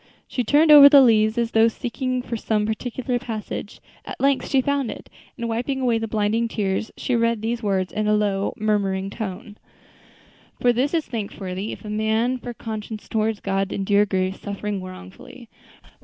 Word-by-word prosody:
She 250 - -2
turned 300 +7 +4
over 285 -1 +11
the 280 -1 +8
leaves 220 -2 +3
as 235 -1 0
though 225 0 +5
seeking 250 +2 -3
for 235 - -4
some 215 -1 0
particular 245 +3 -3
passage; 215 -3 -6 0.2
at - - -8
length 275 -1 +1
she 270 - +3
found 280 -2 0
it, - - -9 0.3
and 235 - -3
wiping 240 +4 -2
away 240 -3 +1
the 225 - -3
blinding 220 +2 0
tears, 210 -1 -2
she 250 - -1
read 230 -2 +1
these 230 +1 -2
words 190 -4 -1
in 215 0 -1
a 210 - +3
low, 200 -2 0
murmuring 195 -2 -1
tone: 210 0 -6 1.0
"For 245 -1 +3
this 270 +7 0
is 320 - 0
thankworthy, 200 -3 -5
if - - -9
a - - -6
man 220 +4 0
for 245 - -6
conscience 220 -1 -7
toward 220 -1 -1
God 195 0 -1
endure 200 +1 +2
grief, 190 0 -1
suffering 205 -1 -4
wrongfully. 185 - -11
220 Hz, 175 wpm, -23 LUFS, 205-245 Hz, 1.0 s, over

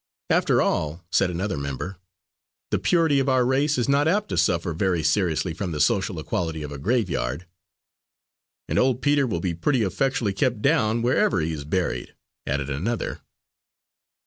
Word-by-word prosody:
"After - - +3
all," 80 +3 -1
said 100 - +3
another 90 0 -2
member, 70 +7 -5 0.7
"the - - +1
purity 165 -5 +3
of 135 0 +1
our 130 -1 +3
race 140 +3 +2
is 120 - 0
not 140 +2 +3
apt 200 +5 +1
to 95 - -2
suffer 85 0 +1
very 90 -1 0
seriously 90 -2 +1
from 90 +1 -4
the 75 - -3
social 70 - +1
equality 80 -3 -3
of 75 - -6
a 70 - -7
graveyard." 90 - -1 1.2
"And - - +1
old 130 -1 +1
Peter 145 -2 +3
will 85 -8 -2
be 90 -2 -1
pretty 115 - +1
effectually 110 +1 0
kept 120 +1 0
down, 115 -4 +2
wherever 120 -5 +2
he 80 +1 -1
is 75 -2 -6
buried," 90 +4 -2 0.3
added 70 -1 -1
another. 90 - -3
95 Hz, 165 wpm, -24 LUFS, 80-130 Hz, 1.2 s, After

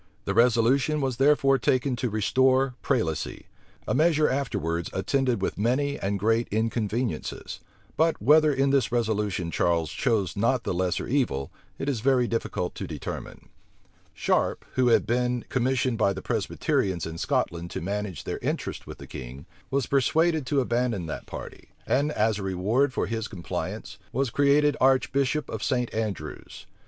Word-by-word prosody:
The 100 - -1
resolution 125 +6 +3
was 130 -4 -1
therefore 135 -1 +4
taken 130 +2 +1
to 125 +1 -1
restore 130 +5 +2
prelacy; 110 - -1 0.4
a - - +1
measure 155 -1 +3
afterwards 85 - -1
attended 120 +2 0
with - - -2
many 140 +6 +1
and 100 +1 -1
great 115 +3 +1
inconveniencies: 110 -2 -2 0.4
but 160 0 +2
whether 150 +6 +5
in 135 0 +2
this 135 -5 +2
resolution 105 -7 -1
Charles 85 -2 +1
chose 100 -6 0
not 115 +4 +1
the - - -1
lesser 90 0 -1
evil, 115 - 0 0.3
it 135 - -4
is 135 -5 0
very 125 0 +3
difficult 115 -6 -2
to - - -6
determine. - - -7 0.7
Sharp, - - 0
who 130 -1 +2
had 120 - +4
been 125 +1 0
commissioned 125 -1 0
by 100 -2 +3
the - - -6
Presbyterians 95 -4 -1
in 80 0 -6
Scotland 85 0 -1
to - - -4
manage 100 -2 -4
their - - -4
interests - - -3
with - - -8
the - - -10
king, 65 +2 -9 0.2
was 135 -2 0
persuaded 155 +2 +2
to 140 -1 +2
abandon 120 -6 0
that 80 - -6
party; - - -9 0.2
and, 145 +4 +1
as 110 -3 +1
a - - -5
reward 105 +9 +1
for - - -1
his 115 -1 -3
compliance, 90 -7 -5
was 130 -1 0
created 145 +2 +3
archbishop 135 +2 +2
of - - -5
St. 125 -2 -1
Andrews. 110 -3 -5
120 Hz, 155 wpm, -26 LUFS, 100-135 Hz, 0.7 s, whether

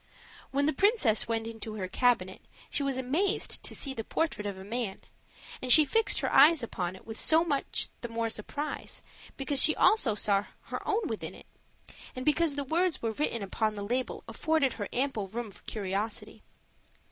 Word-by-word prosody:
When 280 +1 +1
the 310 - +2
princess 390 - +3
went 225 -1 -1
into 225 -1 -7
her 190 -3 -3
cabinet, 190 -3 +1 0.3
she - - 0
was 275 -2 -1
amazed 320 +11 +1
to - - -2
see 275 - -2
the 225 - -5
portrait 215 -7 -2
of 200 -2 -5
a 190 - -9
man; 215 -1 -4 0.6
and 255 - -1
she 305 +3 +8
fixed 450 +8 +2
her - - -1
eyes 295 0 +7
upon 185 -5 -3
it - - -15
with 225 -1 -7
so 320 +1 +4
much 285 -4 0
the 240 - -4
more 230 0 -2
surprise, 285 +8 -4 0.3
because 270 0 +3
she 310 - +6
also 265 - +3
saw 200 -1 +1 0.2
her - - -6
own 425 +3 +1
with - - -4
it, - - -8 0.7
and 255 - -5
because 305 0 +2
the 285 - -2
words 335 +5 0
which 225 -1 -1
were - - +2
written 230 -7 -1
upon 215 +2 -1
the 205 - -5
label 245 +5 -2
afforded 275 +4 +1
her 205 -3 -5
ample 245 -6 -1
room 220 +2 -5
for - - -17
curiosity. 205 +1 -3
245 Hz, 190 wpm, -29 LUFS, 215-295 Hz, 0.7 s, she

